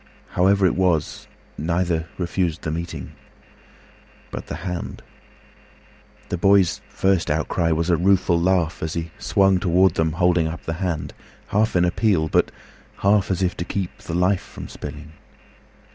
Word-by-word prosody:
However 95 +2 +3
it 90 - +3
was, 90 -5 0 0.3
Neither 85 0 0
refused 85 -2 -1
the 80 - -2
meeting. 85 +2 -5 1.2
But - - -6
the - - -4
hand! 90 -2 -5 1.3
The 90 - -2
boy's 95 -2 +4
first 95 -3 +1
outcry 80 +2 0
was 85 +2 +1
a 85 - +3
rueful 90 -1 +3
laugh, 90 -2 +1
As 80 -1 -3
he 85 -1 -3
swung 95 -1 +3
toward 90 0 +3
them 80 -1 0
holding 90 -1 +2
up 85 +2 -6
the 80 +1 -4
handHalf 95 +5 -2
in 90 0 +4
appeal, 90 -3 +1
but - - +2 0.6
half 100 -1 +4
as 95 0 0
if 90 - 0
to - - -2
keepThe 90 -2 -4
life 90 +2 +2
from - - -10
spilling. 75 +1 -8
90 Hz, 145 wpm, -22 LUFS, 80-95 Hz, 1.3 s, boy's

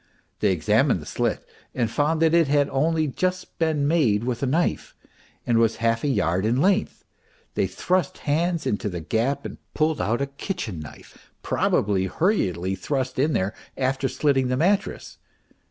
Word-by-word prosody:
They - - +3
examined - - +2
the - - -10
slit - - -2 0.3
and 120 -3 +1
found 155 +7 +1
that 160 0 +3
it 170 -3 +4
had 145 0 +3
only 155 +4 +1
just 185 +6 -3
been 155 -3 +1
made 125 -10 +2
with 120 -1 -2
a 140 - 0
knife 165 +7 -1 0.5
and 115 -1 +2
was 115 -1 +3
half 115 0 0
a - - +1
yard 95 - +1
in 115 +4 +1
length; 195 +6 +1 0.5
they - - +1
thrust 185 -4 -1
hands 165 +3 0
into 105 0 -1
the 90 -2 -5
gap 115 - -1
and - - -7 0.2
pulled 155 0 +1
out 115 +3 0
a 140 - 0
kitchen 140 - -5
knife, 75 -2 -13
probably 95 -2 +1
hurriedly 95 - 0
thrust 130 +7 -2
in 150 +3 +2
there 100 -2 0 0.2
after 135 0 0
slitting 135 -2 +1
the 125 0 0
mattress. 195 +6 0
135 Hz, 170 wpm, -24 LUFS, 115-160 Hz, 0.5 s, it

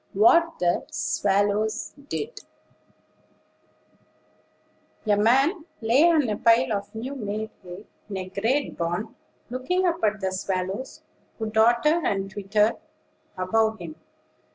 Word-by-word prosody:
WHAT 330 - +4
THE 175 -1 +1
SWALLOWS 205 +2 0 0.2
DID. 470 +3 -4 2.7
A 210 -1 +3
man 270 - +3
lay 250 +9 +4
on 310 -6 +3
a 210 -1 -1
pile 230 +1 +4
of 205 +1 -5
new 250 +5 -5
made 215 -3 -4
hay, 180 +2 -10 0.2
in 195 - -4
a 185 0 -5
great 235 +9 -1
barn, 175 +6 -3 0.4
looking 360 +10 0
up 335 -6 0
at 215 -1 +1
the 190 -1 -1
swallows 190 +5 -4 0.3
who 220 -2 -4
darted 235 +9 +3
and 195 -1 -1
twittered 210 +2 +1 0.6
above 220 +4 +1
him. 165 -4 -8
220 Hz, 120 wpm, -25 LUFS, 195-255 Hz, 2.7 s, WHAT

